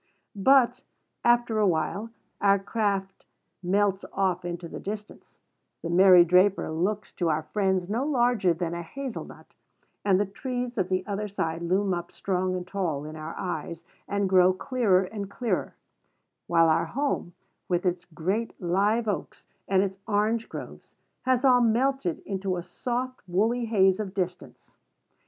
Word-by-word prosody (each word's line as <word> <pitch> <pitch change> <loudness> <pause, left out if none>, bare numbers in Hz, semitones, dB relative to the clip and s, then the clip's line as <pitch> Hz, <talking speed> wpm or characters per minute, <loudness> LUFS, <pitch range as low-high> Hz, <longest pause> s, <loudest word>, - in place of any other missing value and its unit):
But, 250 +3 +4 0.4
after 240 -2 +3
a 210 - +4
little, 190 +6 -1 0.3
our 200 0 +5
craft 195 -2 -2 0.3
melts 195 +1 +1
off 185 -2 0
into 175 0 -5
the - - -8
distance, 210 +1 -8 0.5
"The 170 - -3
Mary 180 -1 +7
Draper" 180 0 +3
looks 195 +6 -2
to 175 -2 0
our 155 0 0
friends 190 +1 0
no 225 +6 -1
larger 245 -9 +2
than 170 0 -2
a 170 - -4
hazel 260 +8 -6
nut, - - -15 0.5
and 195 -2 +3
the 205 - +2
trees 245 +3 -4
of 185 -1 0
the 185 0 0
other 210 0 -3
side 165 -4 -3
loom 190 +3 +1
up 175 0 -4
strong 185 -1 -1
and 180 -1 -4
tall 170 -7 -2
in 155 +1 -7
our 155 +1 -7
eyes, 170 -2 -4 0.2
and 200 -1 0
grow 185 -1 +5
clearer 195 -3 +2
and 200 +1 -6
clearer; 235 +3 -2 0.7
while 165 -1 +4
our 160 +1 +3
home, 235 - -2 0.3
with 175 0 0
its 180 0 -1
great 185 +7 -3
live 205 +6 +1
oaks 205 - -4 0.2
and 190 0 +3
its 195 -1 -4
orange 220 +2 0
groves, - - -9 0.3
has 255 0 +2
all 250 -2 +6
melted 235 -5 +1
into 190 -2 -2
a 175 - -4
soft 250 +8 -4
woolly 225 +7 +1
haze 195 -4 +3
of 200 -3 -4
distance. 180 -2 -5
195 Hz, 155 wpm, -27 LUFS, 180-220 Hz, 0.7 s, Mary